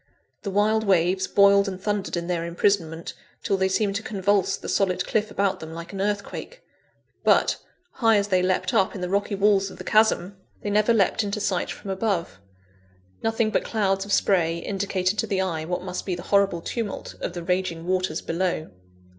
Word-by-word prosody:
The 200 - -4
wild 215 +3 +2
waves 185 -1 +2
boiled 200 0 +5
and 185 -1 -4
thundered 205 -2 -2
in 170 - -3
their 170 -1 -1
imprisonment, 170 -1 0 0.3
till 200 - +1
they 190 0 +2
seemed 195 +1 0
to - - -5
convulse 200 -2 +1
the - - -9
solid 185 -2 +1
cliff 215 0 0
about 200 -1 0
them, 160 0 -8
like 170 +3 -8
an 195 - -3
earthquake. 205 - -4 0.6
But, - - +4 0.3
high 225 -3 +3
as 200 0 0
they 185 -2 +3
leapt 185 0 0
up 190 - +2
in 190 - -6
the 180 - -2
rocky 200 +1 0
walls 200 -1 +3
of - - -12
the - - -8
chasm, 205 -3 +2 0.3
they 205 - -2
never 210 +2 +3
leapt 215 -1 +2
into 205 +1 -3
sight 195 -3 -1
from 195 - -6
above. 190 - -2 0.8
Nothing 225 -1 +1
but - - +1
clouds 195 -3 0
of 200 - -8
spray 170 -5 +2
indicated 195 +1 -1
to - - 0
the 195 - 0
eye, 165 -4 -2
what 180 +1 -3
must 180 -1 -4
be 185 - 0
the 175 - -8
horrible 195 -4 +3
tumult 220 +2 -4
of - - -3
the 175 -1 -5
raging 180 -2 -1
waters 185 -3 -1
below. 170 - -2
195 Hz, 195 wpm, -24 LUFS, 180-205 Hz, 0.8 s, boiled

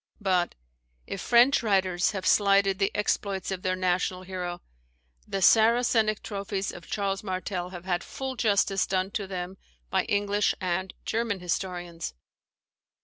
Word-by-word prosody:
But, 185 -4 +1 0.5
if 195 - -5
French 245 +4 +5
writers 190 -5 +2
have 190 -3 -4
slighted 195 -1 +4
the 195 - +3
exploits 200 -2 -1
of 190 -1 -3
their 185 0 0
national 185 0 0
hero, 180 -2 -5 0.6
the 195 -1 -2
Saracenic 225 0 +4
trophies 200 -1 -3
of 175 - -11
Charles 195 -1 -1
Martel 185 -2 -3
have 180 -1 -9
had 175 -1 -1
full 265 -1 -5
justice 200 -4 +2
done 190 0 0
to 200 -2 -3
them 185 0 -5 0.3
by - - +2
English 205 0 +1
and 185 +1 -2
German 225 -3 -1
historians. 175 - -4
190 Hz, 140 wpm, -27 LUFS, 185-205 Hz, 0.6 s, French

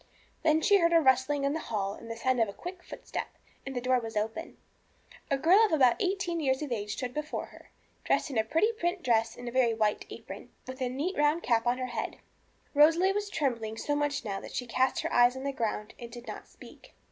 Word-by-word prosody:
Then 315 0 +3
she 405 +5 +5
heard 340 -1 +3
a 335 - +7
rustling 265 0 +3
in 280 +1 +1
the 320 - -2
hall 200 -8 -2
and 230 - -11
the 230 - -4
sound 255 +2 0
of 220 - +2
a - - -7
quick 355 - -8
footstep, - - -6 0.4
and 270 - -5
the - - 0
door 255 0 +2
was 225 -2 -6
opened. 220 +2 -3 0.7
A 275 - +2
girl 380 +9 +5
about 260 -6 +4
eighteen 370 -3 -1
years 265 -1 0
of 290 - -6
age 210 -3 -2
stood 250 -1 -4
before 300 +2 -3
her, - - -16 0.3
dressed - - +1
in 255 - -3
a - - +3
pretty 325 - +2
print 350 -4 -2
dress 225 -2 +1
and 245 -1 -6
very 245 -3 +3
white 215 -2 0
apron, - - -9 0.2
with 260 +1 -8
a 255 - 0
neat 295 +10 -2
round 295 +3 +2
cap 230 -1 +1
on 245 +1 +2
her 255 - -2
head. 235 -3 -4 0.6
Rosalie 325 +6 +5
was 410 0 -2
trembling 230 - -2
so 290 +5 -1
much 290 -2 -1
now 195 -2 -3
that - - -10
she 250 - -2
cast 255 +2 +1
her - - -3
eyes 245 +1 +5
on 260 - -6
the 280 - -1
ground 220 -4 -3
and 235 - -8
did 240 +1 -10
not - - -8
speak. - - -16
260 Hz, 230 wpm, -29 LUFS, 235-315 Hz, 0.7 s, a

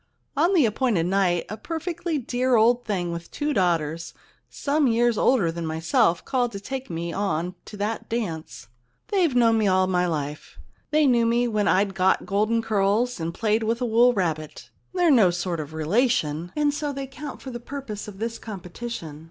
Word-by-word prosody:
On 340 +7 +3
the 310 -8 +5
appointed 220 -5 +1
night 180 -2 +1
a 215 - -6
perfectly 335 - -3
dear 255 0 0
old 235 +2 +4
thing 180 -5 -2
with 170 0 -6
two 295 0 -2
daughters 165 - 0 0.3
some 290 0 +1
years 235 0 +3
older 210 -8 +3
than 170 0 -5
myself 160 +1 +1
called 245 -3 0
to 200 - -5
take 265 +5 -6
me 170 0 -4
on 180 -3 -1
to 210 - -10
that 210 +2 -3
dance. 165 - -4 0.4
They've 355 -9 +2
known 230 -2 +4
me 215 - +2
all 185 0 +3
my 180 -1 +1
life. 150 -2 -4 0.3
They 305 0 +3
knew 240 -3 +4
me 240 +1 +2
when 215 -3 0
I'd 195 +1 +2
got 190 0 +2
golden 215 +3 +1
curls 215 +2 +1
and 165 0 -2
played 215 +4 0
with 225 +1 0
a 250 - 0
wool 235 +2 +5
rabbit. 160 -8 -3 0.2
They're 355 -3 +3
no 220 -9 +6
sort 175 -1 -2
of 150 -1 -6
relation, 165 - 0
and 295 -1 +2
so 295 0 -2
they 275 -1 -5
count 290 +2 -8
for 265 - -6
the 240 - -6
purpose 240 -5 -7
of 205 -2 -9
this 230 +2 -4
competition. 180 -5 -7
215 Hz, 185 wpm, -24 LUFS, 175-250 Hz, 0.4 s, no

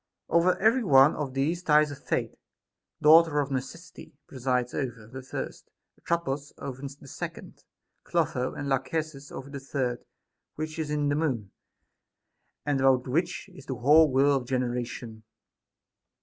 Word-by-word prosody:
Over 170 +2 +3
every 230 +4 +3
one 135 -5 +6
of 135 -3 -4
these 155 +6 0
ties 150 -3 +4
a - - -6
Fate, 135 - -2 0.7
daughter 160 0 +7
of 140 -1 -1
Necessity, 160 +5 -6
presides; 125 -2 -1
over 120 -5 -4
the 130 +4 -9
first, 130 - -7 0.3
Atropos; 145 -4 -2
over 135 -1 -7
the 140 0 -9
second, - - -8 0.4
Clotho; 125 0 -1
and 145 - -4
Lachesis 140 +1 -2
over 135 +1 -8
the 140 - -5
third, 130 -3 -3 0.5
which 155 +1 -5
is 155 -2 -2
in 150 -1 0
the 145 - +1
Moon, 130 -11 -1 1.1
and 145 -2 +1
about 130 -1 +3
which 160 +8 -1
is 180 - -14
the 130 - -3
whole 150 +5 +5
whirl 140 +2 +4
of 125 -2 -6
generation. 120 -3 -3
140 Hz, 145 wpm, -27 LUFS, 130-155 Hz, 1.1 s, daughter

